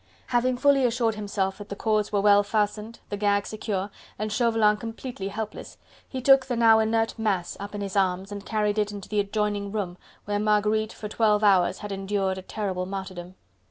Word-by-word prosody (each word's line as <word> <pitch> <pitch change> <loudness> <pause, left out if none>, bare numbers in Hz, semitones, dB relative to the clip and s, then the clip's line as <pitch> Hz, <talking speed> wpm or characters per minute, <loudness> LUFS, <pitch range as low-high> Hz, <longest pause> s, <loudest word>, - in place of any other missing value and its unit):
Having 250 +1 +2
fully 280 +1 +4
assured 235 -2 +1
himself 200 -2 -2
that 205 - -9
the 200 - -4
cords 215 0 0
were 205 -1 +2
well 205 0 +6
fastened, 210 +2 -1
the 205 - -3
gag 200 0 +1
secure 205 -2 -3 0.3
and 215 0 -3
Chauvelin 225 -2 +3
completely 225 -2 -6
helpless, 215 +1 -6 0.3
he 260 -2 -5
took 270 0 +6
the 250 - -1
now 225 -1 +6
inert 225 +1 0
mass 195 -6 -1
up 205 +1 -7
in 205 - -4
his 195 -1 -4
arms 190 0 +1
and 205 -1 -6
carried 210 -1 0
it 210 0 0
into 200 -1 -8
the 210 - 0
adjoining 205 0 -1
room, 190 -4 -3 0.3
where 205 0 -1
Marguerite 215 +1 +1
for 215 - -7
twelve 210 -1 +2
hours 190 -4 +4
had 205 - -6
endured 195 -1 -1
a - - -7
terrible 185 -2 -3
martyrdom. 185 -2 -6
210 Hz, 195 wpm, -26 LUFS, 200-220 Hz, 0.3 s, well